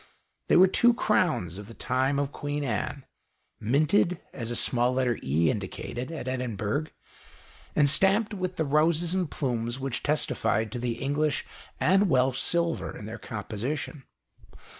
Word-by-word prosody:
They - - +5
were 185 - +9
two 235 +5 +4
crowns 155 - +1
of 105 - -9
the 115 - -11
time 130 +2 0
of 140 0 -1
Queen 145 0 -3
Anne, 130 +3 -3 0.5
minted, 155 - +2
as 115 -3 -5
a 120 - -2
small 120 +1 +2
letter 125 -2 0
E 80 +5 +2
indicated, 120 +5 -5
at 155 -6 -6
Edinburgh, 125 +2 -2 0.9
and 145 -1 +5
stamped 195 +8 +3
with 185 -2 -3
the 160 - 0
roses 160 +4 +2
and 185 -4 0
plumes 120 -2 -2
which 135 -2 -2
testified 110 -7 +1
to 125 - -4
the 120 -1 -1
English 145 +5 -1 0.3
and 195 +3 +4
Welsh 130 -2 +2
silver 170 -1 -1
in 105 - -8
their 110 +2 -7
composition. 115 +9 -4
135 Hz, 150 wpm, -27 LUFS, 120-160 Hz, 0.9 s, were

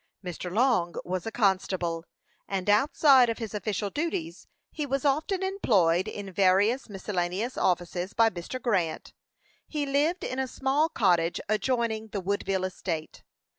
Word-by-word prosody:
Mr. 180 0 -5
Long 215 -6 +2
was 185 +2 -3
a - - -3
constable, 185 -6 0 0.4
and 195 +1 0
outside 265 +2 +5
of 230 - -2
his 225 -3 -6
official 205 -1 -2
duties, 335 +2 -3 0.2
he 305 - -4
was 275 0 -2
often 315 +7 +1
employed 195 - +2
in 195 -2 -6
various 200 +7 +3
miscellaneous 195 +3 -2
offices 180 +1 -1
by 230 0 +4
Mr. 175 +8 -6
Grant. 190 -10 -1 0.5
He 295 -2 -2
lived 290 +6 +1
in 255 - -3
a 265 - 0
small 275 +5 +1
cottage 175 - +2
adjoining 220 0 0
the 205 -2 -4
Woodville 195 0 -1
estate. 170 -4 -5
210 Hz, 140 wpm, -27 LUFS, 185-265 Hz, 0.5 s, outside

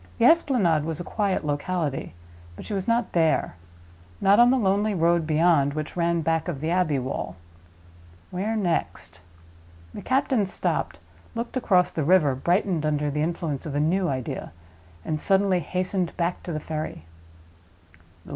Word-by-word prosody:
The - - +3
Esplanade 240 - +4
was 160 0 -4
a - - -4
quiet 200 -4 -1
locality; 145 - -2 0.4
but - - -10
she - - -5
was 190 -2 -3
not 235 +1 +1
there—not 90 - 0
on 240 +1 +7
the 265 - +3
lonely 205 -1 +1
road 170 -1 +2
beyond, 155 -3 +3
which 155 -1 -5
ran 170 -1 +1
back 160 0 0
by 175 - -2
the 155 +4 -3
Abbey 175 -5 +1
Wall. 130 -7 -4 1.0
Where 200 +5 -2
next? 175 - -2 0.7
The - - -7
captain 260 -5 +1
stopped, - - -2 0.4
looked 235 +2 -4
across 185 -8 +2
the 160 - -2
river, 155 -3 +4
brightened 175 +4 0
under 150 -1 0
the 150 +1 -1
influence 160 -3 -2
of 145 - -5
a - - +1
new 175 +5 +1
idea, 130 -3 -4 0.5
and 155 -1 -2
suddenly 195 -1 +2
hastened 180 +2 -2
back 175 +1 -1
to 175 - -6
the 155 - -2
ferry. 155 - -5
170 Hz, 155 wpm, -25 LUFS, 150-190 Hz, 1.0 s, on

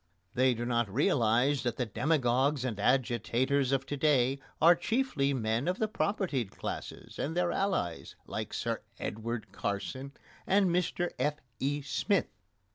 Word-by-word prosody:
They 130 0 +3
do 120 +1 -3
not 120 -4 0
realise 130 - +3
that 120 -2 -2
the 125 - 0
demagogues 135 +1 +1
and 110 -5 -3
agitators 130 +3 +1
of 135 0 +1
to 145 - -3
day 135 -2 +3 0.2
are 170 +2 +8
chiefly 175 - 0
men 115 0 0
of 180 +1 +1
the 220 - +1
propertied 190 - -1
classes - - -7
and 160 +4 -2
their 180 -1 +2
allies, 185 - -1
like - - -4
Sir - - -2 0.2
Edward 110 -1 -4
Carson 105 +8 -4 0.3
and 195 -2 +4
Mr 175 0 0
F.E. 145 -1 -2
Smith. 145 +8 0
135 Hz, 140 wpm, -31 LUFS, 120-160 Hz, 0.3 s, are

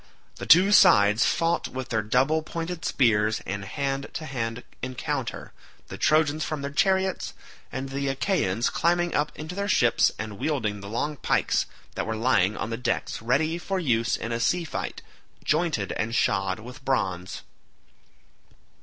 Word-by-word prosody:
The - - -7
two 185 +4 +7
sides 105 - +6
fought 170 0 +1
with 130 -1 -6
their 110 -2 +1
double 130 +9 +2
pointed 165 +2 -5
spears 110 -4 +2
in 100 +1 -4
hand 135 +6 -3
to 155 - -5
hand 120 -4 -4 0.2
encounter 130 +1 -4 0.4
the - - -7
Trojans 155 0 +2
from 155 -2 -4
their 140 - -3
chariots, 190 +2 +1 0.4
and 130 +2 -4
the 140 +1 -2
Achaeans 135 - 0
climbing 175 0 +1
up 150 +1 0
into 155 +3 -7
their 200 +2 -2
ships 120 - +3
and 105 -2 -6
wielding 110 -10 -1
the 100 0 -8
long 145 +7 -2
pikes - - +1 0.3
that - - -3
were 110 - -2
lying 110 -4 +2
on 110 - -3
the 115 - -2
decks 120 -2 -2
ready 150 +8 +1
for 190 +2 -2
use 115 -8 +1
in 115 - -5
a 115 - -1
sea 175 +9 +1
fight, 160 - -5 0.4
jointed 150 - 0
and 115 +1 -2
shod 95 -2 +1
with 125 +4 -11
bronze. 95 -9 -2
130 Hz, 160 wpm, -26 LUFS, 110-160 Hz, 0.4 s, two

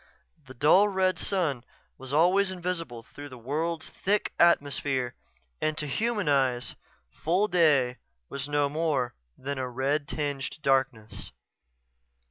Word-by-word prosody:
The 130 - -11
dull 180 +10 +5
red 190 -2 +1
sun 155 -11 -1 0.4
was 130 0 -8
always 180 +6 +4
invisible 175 -10 -4
through 145 +5 -11
the 130 - -10
world's 155 +7 -3
thick 205 +2 -1
atmosphere 140 -6 +2 0.5
and 155 0 0
to 150 - -2
human 210 - -1
eyes 130 -4 +1 0.4
full 185 +6 +1
day 145 -9 +3 0.3
was 140 - -5
no 145 -1 +2
more 145 -5 -1 0.2
than 140 +1 -4
a 130 -1 -2
red 140 +4 -1
tinged 145 -1 -3
darkness. 130 - 0
145 Hz, 125 wpm, -28 LUFS, 130-170 Hz, 0.5 s, dull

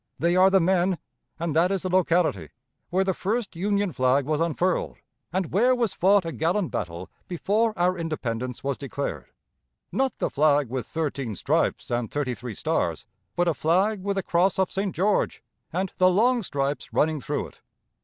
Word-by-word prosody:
They 170 +2 +2
are 185 +1 +6
the 195 0 +4
men, 180 +1 +2 0.4
and 165 -2 -2
that 170 +3 +4
is 195 -2 -1
the 185 - -2
locality, 170 - +2 0.4
where 190 +2 +2
the 190 0 0
first 210 +2 -2
Union 200 0 0
flag 130 +2 +2
was 155 +2 0
unfurled, 170 +2 0 0.3
and 185 -1 -2
where 245 +8 +4
was 235 -5 0
fought 195 0 +3
a 165 - -3
gallant 170 +4 0
battle 90 -2 -5 0.2
before 210 +6 +1
our 180 +1 +2
independence 125 -7 -3
was 140 -1 -2
declared 140 - -4 0.6
not 265 0 0
the - - -1
flag 145 -3 +3
with 130 0 -4
thirteen 140 -8 -3
stripes - - 0
and 120 -1 -1
thirty 145 -4 -2
three 120 -3 -7
stars, - - -1 0.3
but 175 0 +1
a 170 - +3
flag 190 +7 +1
with 200 +1 -2
a 195 - 0
cross 180 +3 +2
of 190 -1 +1
St. 195 -1 -2
George, 200 +4 +1 0.3
and 185 +2 -2
the 185 0 +5
long 235 +6 +3
stripes 140 -6 -2
running 155 -1 +1
through - - -3
it. - - -25
175 Hz, 180 wpm, -25 LUFS, 145-190 Hz, 0.6 s, are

